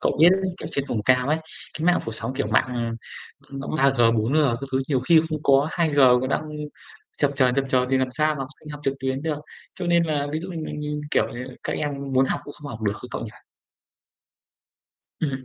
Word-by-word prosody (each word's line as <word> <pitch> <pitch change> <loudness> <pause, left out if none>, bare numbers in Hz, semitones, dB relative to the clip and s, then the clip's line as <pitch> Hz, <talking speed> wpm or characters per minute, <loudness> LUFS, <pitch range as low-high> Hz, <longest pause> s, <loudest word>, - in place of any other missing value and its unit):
Cậu - - +1
biết 170 - +9 0.3
ở - - -4
trên 140 - -1
vùng 110 -3 -1
cao 125 +3 +3
ấy, 155 +1 +2 0.4
cái 160 - -2
mạng 180 0 +5
phủ 115 - -4
sóng 115 +3 -4
kiểu 130 - -1
mạng 110 +2 +3 0.9
mạng 135 0 -6
3G, 130 -5 +4
4G 115 +6 +1 0.3
các 135 - -5
thứ 130 - +2
nhiều 135 -4 +2
khi 160 +5 +5
không 155 -1 -3
có, 140 +2 +4
2G 160 -4 0 0.2
còn 130 - -2
đang 155 - 0 0.8
chập 145 -1 +3
chờn, 130 -3 +3
chập 135 0 +1
chờn 125 -1 +2
thì 135 - +3
làm 130 -1 +1
sao 155 +3 +1
mà - - -7
học 135 - -4
sinh 155 - -13
học 145 -1 -7
trực 135 - +1
tuyến 130 +1 -2
được. 155 -2 -1 0.4
Cho 180 -2 -4
nên 170 0 +4
là 150 -3 0
ví 155 - -1
dụ 180 - -7
như 170 - -5
mình - - -5
mình 150 0 -3
kiểu, - - +3
ờ, - - -9 0.3
các - - -2
em 150 - -1 0.2
muốn 130 +1 +4
học - - -1
cũng 145 - -8
không 145 - -9
học 110 -5 -7
được 105 -1 +1
ấy 125 - -8
cậu - - -4
nhỉ? 110 - -7 1.9
Ừm, 135 -4 -2
140 Hz, 235 wpm, -24 LUFS, 130-150 Hz, 1.9 s, biết